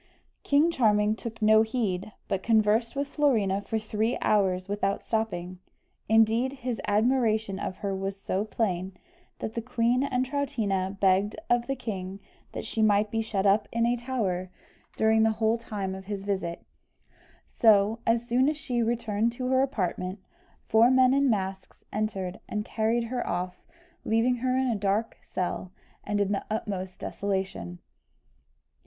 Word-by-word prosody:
King 295 +4 +3
Charming 215 -6 +3
took 225 0 -7
no 220 0 +6
heed, 215 -4 -1 0.2
but 190 - -1
conversed 220 +2 +2
with 280 0 -1
Florina 225 -10 +1
for 220 +2 -2
three 220 +2 -1
hours 190 -3 +1
without 200 -1 -1
stopping. 185 -5 -2 0.5
Indeed, 225 +4 +4
his 255 -3 -4
admiration 220 -2 +2
of 185 - -4
her 195 -1 -1
was 195 +1 -4
so 195 0 -1
plain, 190 -4 -2 0.4
that 220 - -5
the 230 - -2
queen 245 +1 +1
and 255 -2 0
Troutina 205 -9 -1
begged 195 +1 +3 0.2
of 240 0 +2
the 270 - -1
king 195 -6 -5 0.3
that - - -5
she 225 - -2
might 210 -1 +3
be 225 - 0
shut 205 -3 -2
up 200 +2 +3
in 230 0 +1
a 240 +1 +2
tower 220 -8 -2 0.5
during 220 0 +4
the 220 0 +3
whole 220 +1 +1
time 205 -4 -4
of 190 0 -8
his 200 -1 -4
visit; 190 -4 -3 0.8
so, 215 0 +4
as 230 +1 +2
soon 255 +3 +3
as 305 - -2
she 280 -6 -2
had 230 - +1
returned 225 -1 0
to 255 +1 -3
her 260 0 +4
apartment, 185 -7 -2 0.5
four 225 +2 +5
men 260 0 +5
in 275 0 +3
masks 190 -3 -3
entered, 200 -3 -2
and 210 0 -2
carried 225 +1 0
her 245 +1 -3
off, 180 +1 -3 0.4
leaving 230 +3 +2
her 255 +1 0
in 260 - +2
a 235 - +1
dark 205 +2 -1
cell, 180 0 -4 0.3
and 205 0 -1
in 200 -1 +1
the 200 - -1
utmost 190 -4 -3
desolation. 190 - -3
220 Hz, 160 wpm, -27 LUFS, 195-235 Hz, 0.8 s, no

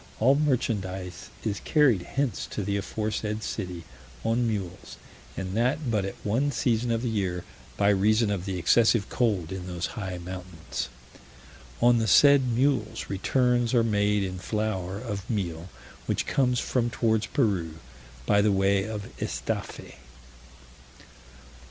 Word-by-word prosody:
All 130 +5 +5
merchandise 100 - -1
is 105 -3 -2
carried 140 - +3
hence 135 +6 -2
to 105 - -4
the 100 +1 -1
aforesaid 105 +1 -2
city 90 -5 -4 0.4
on 115 +1 +1
mules, 95 -5 -4 0.4
and 95 0 -4
that 125 +3 +1
but 105 -3 +1
at 95 - -5
one 130 +8 +1
season 120 -2 0
of 115 0 0
the - - 0
year, 95 -6 -1 0.3
by 100 0 +3
reason 105 +2 +3
of 95 -3 -2
the 95 -2 -3
excessive 110 +4 +3
cold 100 -9 0
in 95 -1 -5
those 90 -2 -3
high 95 -5 -4
mountains. 90 -1 -6 0.9
On 120 -1 +6
the 110 - 0
said 140 +1 +6
mules 120 -4 0
returns 120 +4 +1
are 115 - +5
made 105 -2 +2
in 95 -1 -4
flour 100 -2 -2
of 105 -2 -5
meal, 90 -6 -3 0.4
which - - 0
comes 125 -3 +2
from 120 -2 0
towards 110 -3 +1
Peru, 95 - 0 0.5
by 100 +6 +4
the 105 0 +3
way 95 0 +2
of 105 -2 -5
Estaffe. - - -4
105 Hz, 140 wpm, -27 LUFS, 95-120 Hz, 0.9 s, On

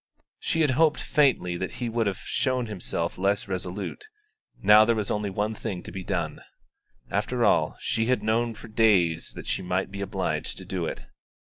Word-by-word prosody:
She 165 - 0
had 150 -4 +4
hoped 150 +3 +3
faintly 130 - +2
that 95 +1 -4
he 120 - -3
would 115 -1 0
have 100 - -1
shown 130 -2 -1
himself 90 -5 -3
less 100 +2 +1
resolute; 95 - -5 0.5
now 105 +2 +7
there 115 +1 +3
was 105 -2 -2
only 105 -1 -1
one 105 +3 -1
thing 100 -5 -5
to - - -8
be 95 -1 -6
done. 85 -5 -2 0.7
After - - +1
all, - - +3
she 115 0 0
had 125 -4 +1
known 115 +1 +1
for 110 - -11
days 100 -7 +3
that - - -8
she - - -1
might 90 +1 -1
be 100 0 -6
obliged 100 - -2
to - - -8
do - - -2
it. - - -6
105 Hz, 190 wpm, -26 LUFS, 95-115 Hz, 0.7 s, now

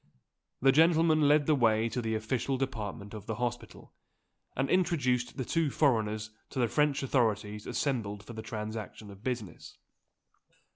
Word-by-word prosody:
This 135 0 +6
gentleman 160 -1 +4
led 145 0 +4
the 155 - +3
way 115 -4 +3
to 125 - -2
the 110 -1 -1
official 120 +4 -1
department 105 -6 -4
of 110 -1 -8
the 110 - -2
hospital, 120 +1 -5 0.6
and 135 +1 0
introduced 130 -9 +1
the 130 - -2
two 165 +1 +1
foreigners 110 -7 +1 0.2
to - - -9
the 120 -2 +3
French 150 +1 +1
authorities 105 -5 0
assembled 105 -8 -2
for 115 - -10
the 110 - -6
transaction 110 -1 -6
of 100 +2 -14
business. 120 -7 -5
120 Hz, 150 wpm, -30 LUFS, 110-140 Hz, 0.6 s, This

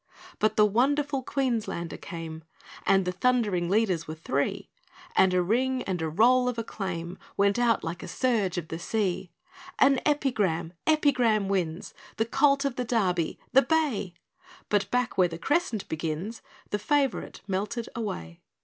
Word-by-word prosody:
But 215 0 +2
the 210 - +6
wonderful 275 +6 +1
Queenslander 235 - -2
came, 165 -2 -7 0.4
And 195 -1 +4
the 180 - 0
thundering 205 -4 +1
leaders 195 -5 +1
were 155 - -5
three; 140 -3 -2 0.5
And 190 -1 +5
a 180 -1 +2
ring, 255 +6 +1
and 180 -3 -3
a 160 - -1
roll 250 +9 +4
of 245 - -4
acclaim, 185 -6 -4 0.2
Went 200 +3 +3
out, 235 -3 +2
like 165 +1 -4
a - - -7
surge 220 -9 0
of 165 -2 -4
the 165 - -4
sea: 190 -1 -1 0.5
"An 275 -1 +5
Epigram! 205 - 0
Epigram 250 -9 +3
wins!" 175 -3 -2 0.2
"The 225 - +2
Colt 275 +3 +3
of 275 -3 -2
the 250 - 0
Derby" 185 -9 0 0.2
"The 265 - +8
bay!" 275 - 0 0.5
But 205 -1 +1
back 250 -5 0
where 180 - +6
the 165 -1 -7
crescent 275 - 0
begins 160 +8 -4 0.3
The 205 - 0
favourite 275 +3 0
melted 210 +5 -2
away. 85 - -5
210 Hz, 155 wpm, -27 LUFS, 175-250 Hz, 0.5 s, The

